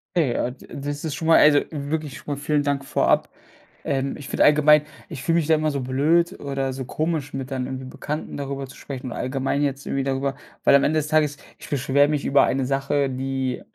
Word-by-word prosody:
Okay. 150 -9 +2
Ah, 125 - -1
d 130 - -15
das 145 +1 -5
ist 155 -3 -3
schon 160 - -4
mal, 165 - +7
also 145 -1 +6
wirklich 150 -1 -4
schon 145 - -4
mal - - -11
vielen 150 0 +1
Dank 140 -1 -1
vorab. - - +2 0.5
Ähm, 135 -1 -1
ich 145 - -9
finde - - +2
allgemein, 150 0 +6 0.3
ich 130 - -7
fühle 165 0 +2
mich 160 -3 0
da 160 - +5
immer 155 0 0
so 140 -1 -2
blöd 150 +7 +1
oder 135 -1 -2
so 130 0 -5
komisch, 155 0 -2
mit 135 -1 -5
dann 130 -1 -2
irgendwie 130 0 -6
Bekannten 150 +4 -5
darüber 140 -1 -4
zu 135 - -14
sprechen 130 -2 -7
und 120 - -5
allgemein 135 +2 -1
jetzt 140 -1 -2
irgendwie 135 - -1
darüber, 135 0 -1 0.3
weil - - +6
am 140 - +5
Ende 155 +1 +2
des 150 - -3
Tages 150 -2 +2 0.2
ich - - -12
beschwere 140 +1 +3
mich 150 -1 -1
über 140 0 +5
eine 135 0 0
Sache, 140 +1 0
die 130 0 -2
140 Hz, 225 wpm, -23 LUFS, 135-150 Hz, 0.5 s, mal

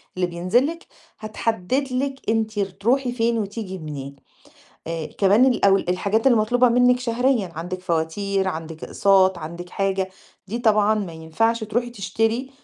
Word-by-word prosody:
اللي 185 -1 0
بينزل 180 +9 +1
لِك، 335 +2 -7 0.3
هتحدِّد 225 +4 -2
لِك 270 +1 -2
أنتِ 220 -1 0
تروحي 230 +7 0
فين 235 -1 0
وتيجي 200 -2 -5
منين. 140 -4 -7 0.7
آآ 165 -1 -3
كمان 200 - +3
الأول 200 -6 +3
الحاجات 200 +6 0
المطلوبة 245 0 +4
منِّك 245 +1 +4
شهريًا، 240 -5 0
عندِك 175 +3 -5
فواتير، 185 +3 -1
عندِك 160 -2 -6
أقساط، 190 -2 +3
عندِك 170 +2 -8
حاجة، 195 -1 -1 0.4
دي 220 +5 -4
طبعًا 215 -2 +3
ما 200 -5 -3
ينفعش 220 +9 -1
تروحي 240 +3 -2
تشتري 225 +4 -1
205 Hz, 140 wpm, -22 LUFS, 180-235 Hz, 0.7 s, المطلوبة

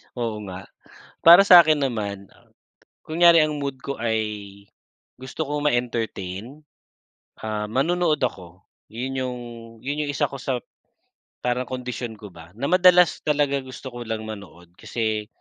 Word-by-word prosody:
Oo 115 -3 -3
nga. 95 +1 -8 0.6
Para 170 +4 +9
sa'kin 160 -6 +7
naman, 100 -5 -4
uh, - - -25 0.6
kunyari 170 +1 +5
ang 150 -1 -3
mood 140 -2 -4
ko 140 +2 -5
ay 110 -1 0 1.0
gusto 130 +4 -5
ko 145 +1 -3
ma-entertain, 120 -1 -3 0.8
ah, 105 -1 -3
manonood 155 +7 +1
ako. 90 -6 -4 0.3
Yun 125 +4 -4
yung 125 -1 -3 0.4
yun 145 +2 -2
yung - - -2
isa 140 - 0
ko 140 - -7
sa 125 0 -2 0.8
parang 125 +1 0
kondisyon 125 -2 -5
ko 105 - -10
ba 80 0 -13
na 140 - -1
madalas 180 -1 +5
talaga 145 -2 +1
gusto 130 0 -9
ko 120 - -10
lang 110 -1 -3
manood 90 -5 -10
kasi 110 -2 -2
125 Hz, 140 wpm, -23 LUFS, 110-145 Hz, 1.0 s, Para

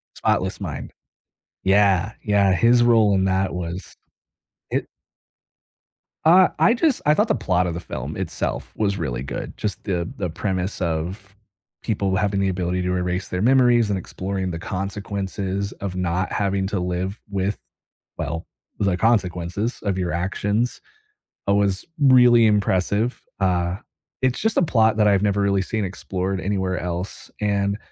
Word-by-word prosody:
Spotless - - 0
Mind. - - -5 0.7
Yeah, 100 0 +3
yeah. 100 -2 +3
His 120 +5 +4
role 110 -4 +5
in 95 - +2
that 95 -1 +1
was 90 +1 -6 0.7
it - - -1 1.4
Uh, 180 +3 +7
I 235 - +5
just 275 +1 +1
I 150 - +5
thought 210 +8 +2
the - - +3
plot 90 -6 +1
of 85 - -2
the 85 - -4
film - - -6
itself - - -3
was 100 -2 0
really 65 -8 -3
good. - - -6
Just 100 -4 -3
the 90 -4 -1
the 90 -4 -2
premise 95 +2 -3
of 90 +5 -3 0.5
people 100 -4 0
having 100 0 +1
the 95 - +2
ability 90 0 -1
to 90 0 0
erase 90 +1 -2
their 90 - -2
memories 120 -2 +4
and 100 - 0
exploring 95 +1 -4
the 80 - -5
consequences 100 0 -3
of 95 -2 -5
not 90 0 -1
having 100 -2 0
to 100 -1 -2
live 90 +3 -3
with 100 +1 -1 0.6
well, 80 +3 -3 0.3
with 100 - 0
the 90 - 0
consequences 100 0 0
of 100 -2 0
your 90 -2 -1
actions, 105 +6 -1 0.7
oh, 100 - +3
was 100 -2 +1 0.2
really 125 -4 +6
impressive. 105 +2 +1 0.2
Uh, 90 -1 +1 0.4
it's 130 -1 +1
just 220 +1 0
a - - +5
plot 110 -8 +3
that 105 - +5
I've 100 -1 +3
never 100 -1 +1
really 100 -1 +2
seen 110 +1 -2
explored 95 0 -3
anywhere 95 0 -1
else 90 +2 -5
and 100 -1 0
100 Hz, 155 wpm, -22 LUFS, 90-105 Hz, 1.4 s, Uh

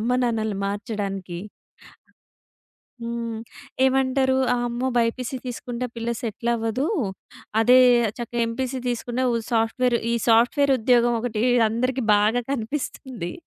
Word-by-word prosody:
అమ్మ, 235 +3 -1
నాన్నలని 220 -4 -1
మార్చడానికి. 200 -4 -4 1.6
హ్మ్. 235 -1 -4 0.5
ఏమంటారు? 265 0 +2 0.2
"అమ్మో! 240 +1 -1
బైపీసీ 235 +2 0
తీసుకుంటే 245 0 -4
పిల్ల 230 0 -4
సెటిల్ 235 +1 -3
అవ్వదూ. 225 +4 -1 0.7
అదే 250 +3 +6 0.4
చక్కగా 240 0 -3
ఎంపీసీ 260 +2 -3
తీసుకున్నా 245 +1 -2
ఉ - - +2 0.2
సాఫ్ట్‌వేర్" 235 +2 +2 0.2
ఈ - - +2
సాఫ్ట్‌వేర్ 245 +5 +4
ఉద్యోగం 240 +1 +3
ఒకటి 225 -2 -2 0.3
అందరికి 255 +2 -1
బాగా 215 +4 +2
కనిపిస్తుంది. 255 - -4
235 Hz, 105 wpm, -23 LUFS, 225-255 Hz, 1.6 s, అదే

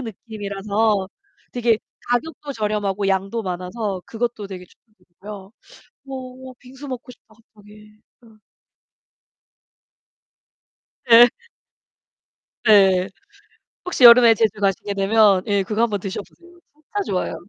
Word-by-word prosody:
느낌이라서 210 -2 -2 0.4
되게 235 -3 +1 0.3
가격도 285 +3 -3
저렴하고 210 -3 -2
양도 195 +4 -1
많아서 185 +2 -4
그것도 230 -3 -4
되게 185 -2 -9
추천드리고요. 195 0 -14 0.6
어 270 - -10 0.4
어 255 - -12
빙수 265 +3 -12
먹고 255 -1 -7
싶다 220 -2 -22
갑자기. 210 -1 -19 0.2
어. 225 -2 -20 2.7
예. 240 +1 +8 1.4
예. 190 -3 +5 0.8
혹시 360 -7 -1
여름에 235 -1 +9
제주 215 -1 0
가시게 200 0 -1
되면 195 -1 +3
예 200 -1 +1
그거 215 +4 -1
한번 210 -4 -1
드셔 190 0 -5
보세요. 350 0 -21
진짜 310 +7 -6
좋아요. 185 - -2
215 Hz, 245 characters per minute, -21 LUFS, 195-235 Hz, 2.7 s, 여름에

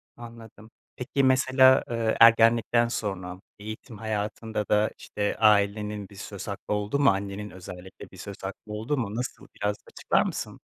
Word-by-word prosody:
Anladım. 115 -2 -13 0.2
Peki, 135 +2 -1
mesela, 130 0 +5
eee, 115 -2 0
ergenlikten 115 +1 +5
sonra 95 -5 -4 0.2
eğitim 110 +2 -9
hayatında 110 0 -3
da, 105 +1 +2
işte, 105 0 -3
ailenin 105 -1 +2
bir 100 - -15
söz 95 0 -8
hakkı 100 0 -4
oldu 105 +6 -1
mu? 145 - +5
Annenin 100 +1 -3
özellikle 90 0 -11
bir - - -14
söz - - -8
hakkı 105 - -7
oldu 110 +8 -2
mu? 110 -5 -3
Nasıl? 125 +2 -5
Biraz 105 0 -1
açıklar - - 0
mısın? - - -5
110 Hz, 150 wpm, -26 LUFS, 100-115 Hz, 0.2 s, mesela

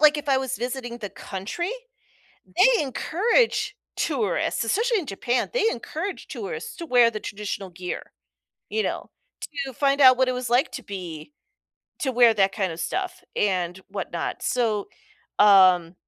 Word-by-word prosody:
like, 305 0 +6
if 290 - -7
I 270 - +4
was 265 -2 -3
visiting 245 -1 -4
the 205 -4 -6
country, 205 - -5 0.8
they 445 +7 +4
encourage 395 - +1 0.2
tourists, 235 - 0
especially 450 - +1
in 345 - -6
Japan, 240 +3 -1
they 480 -2 +3
encourage 335 - -5
tourists 465 +3 -6
to 340 - -6
wear 245 -5 +5
the 215 -2 -5
traditional 205 -2 -5
gear, 180 0 -6 0.6
you 440 - 0
know, - - -4 0.6
to 265 - -6
find 275 +2 +1
out 260 -2 +8
what 260 0 +2
it - - +1
was 250 -1 -4
like 250 +6 +3
to 260 - -6
be 180 - -7 0.7
to 265 - 0
wear 240 -2 +6
that 195 -2 +3
kind 190 -5 -1
of 165 - -7
stuff 370 - -3
and 180 -3 0
whatnot. 190 -4 -4
So, 220 -5 0 0.5
um, 185 -4 +6
245 Hz, 155 wpm, -24 LUFS, 195-305 Hz, 0.8 s, out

